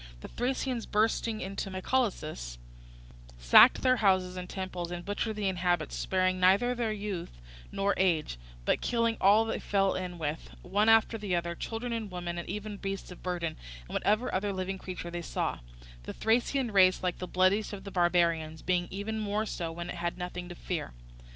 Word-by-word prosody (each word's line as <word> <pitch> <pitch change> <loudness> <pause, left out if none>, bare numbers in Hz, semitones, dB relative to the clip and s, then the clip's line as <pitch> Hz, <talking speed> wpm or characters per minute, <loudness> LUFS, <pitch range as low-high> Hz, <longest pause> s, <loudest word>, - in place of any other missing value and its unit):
The - - -8
Thracians 250 -1 -2
bursting 220 +1 +1
into 195 +1 -4
Mycalessus 185 - -2 0.8
sacked - - +7
the 255 0 +4
houses 185 -4 +2
and 180 0 -6
temples, 185 -2 -4
and 175 0 -6
butchered 215 +2 -2
the 205 -2 -1
inhabitants, 175 -3 0
sparing 185 -1 +1
neither 195 +7 +4 0.2
youth 200 - -5 0.3
nor 200 0 +1
age, 160 - +1 0.3
but - - +2
killing 230 -1 +1
all 205 +4 +6
they 225 - -2
fell 195 -1 +1
in 180 -1 -4
with, 155 -1 -4
one 205 +4 +2
after 225 0 +4
the 200 -4 -1
other, 170 0 -1
children 225 +6 -4
and 225 -3 -3
women, 175 -1 -4
and 170 - -7
even 210 0 -5
beasts 195 -1 -5
of 180 - -11
burden, 175 -3 -3 0.2
and - - -19
whatever 215 +5 +1
other 200 +2 0
living 190 0 -3
creatures 180 -2 -6
they 175 - -3
saw; - - -2 0.4
the - - -7
Thracian 240 +2 +1
race, 185 -2 +5
like 180 -1 -1
the 180 - -4
bloodiest 185 +4 +2
of 200 -2 -7
the 200 - -8
barbarians, 170 -3 +1
being 180 -1 +1
even 210 +3 -4
more 210 +1 -1
so 170 -6 -4
when 170 +1 -6
it - - -6
has 170 +1 -2
nothing 180 0 -5
to 175 - -7
fear. 165 - -4
185 Hz, 180 wpm, -30 LUFS, 175-210 Hz, 0.8 s, sacked